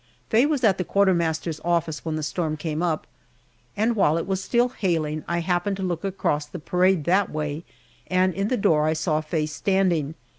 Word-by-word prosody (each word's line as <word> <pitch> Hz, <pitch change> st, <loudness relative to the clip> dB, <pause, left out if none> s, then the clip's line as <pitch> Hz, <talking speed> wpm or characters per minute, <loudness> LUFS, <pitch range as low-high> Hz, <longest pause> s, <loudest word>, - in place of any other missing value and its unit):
Faye 240 Hz, +6 st, +5 dB
was 295 Hz, -4 st, -1 dB
at 195 Hz, -4 st, +3 dB
the -, -, +1 dB
quartermaster's 170 Hz, -5 st, +1 dB
office 170 Hz, -3 st, 0 dB
when 160 Hz, -1 st, -2 dB
the 155 Hz, -, -3 dB
storm 155 Hz, 0 st, -2 dB
came 155 Hz, +1 st, -3 dB
up, 165 Hz, -3 st, -1 dB, 0.7 s
and 225 Hz, +3 st, +2 dB
while 165 Hz, -6 st, +3 dB
it 165 Hz, -, -2 dB
was 190 Hz, -1 st, -2 dB
still 240 Hz, +4 st, +2 dB
hailing 160 Hz, -9 st, -1 dB
I 170 Hz, 0 st, 0 dB
happened 180 Hz, +3 st, 0 dB
to 190 Hz, -, -4 dB
look 175 Hz, -2 st, -2 dB
across 165 Hz, -6 st, -1 dB
the 180 Hz, -, -7 dB
parade 180 Hz, +1 st, +2 dB
that 190 Hz, +5 st, +2 dB
way, 150 Hz, +1 st, -4 dB, 0.4 s
and 185 Hz, 0 st, +2 dB
in 195 Hz, +3 st, -1 dB
the 255 Hz, -, 0 dB
door 155 Hz, -5 st, +3 dB
I 155 Hz, -, +2 dB
saw 155 Hz, -1 st, 0 dB
Faye 155 Hz, 0 st, -1 dB
standing. 165 Hz, -1 st, 0 dB
170 Hz, 195 wpm, -24 LUFS, 155-195 Hz, 0.7 s, Faye